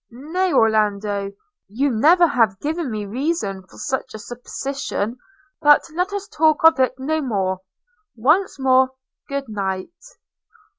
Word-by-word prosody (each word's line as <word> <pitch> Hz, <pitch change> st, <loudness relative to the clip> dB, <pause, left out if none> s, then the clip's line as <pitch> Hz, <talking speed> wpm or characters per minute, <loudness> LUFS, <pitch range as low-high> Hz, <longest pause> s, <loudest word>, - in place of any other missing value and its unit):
– -, -, -67 dB
'Nay, 320 Hz, +10 st, -2 dB
Orlando, 210 Hz, -3 st, +1 dB, 0.4 s
you 260 Hz, +8 st, 0 dB
never 325 Hz, +10 st, +5 dB
have 230 Hz, -, +2 dB
given 315 Hz, 0 st, -2 dB
me 215 Hz, -2 st, -4 dB
reason 225 Hz, -, -2 dB
for -, -, -17 dB
such 265 Hz, -3 st, -3 dB
a -, -, -5 dB
supposition; 245 Hz, 0 st, -5 dB, 0.4 s
but 295 Hz, -1 st, +6 dB
let 360 Hz, +4 st, -1 dB
us 405 Hz, 0 st, -4 dB
talk 315 Hz, -6 st, +2 dB
of 325 Hz, -3 st, +6 dB
it 260 Hz, 0 st, +2 dB
no 310 Hz, +4 st, -1 dB
more 190 Hz, -8 st, -1 dB, 0.3 s
– 425 Hz, -3 st, -46 dB
once 310 Hz, -, +2 dB
more, 260 Hz, -1 st, +3 dB, 0.4 s
good 280 Hz, -1 st, -3 dB
night!' 210 Hz, -, -5 dB
265 Hz, 145 wpm, -21 LUFS, 215-315 Hz, 0.4 s, but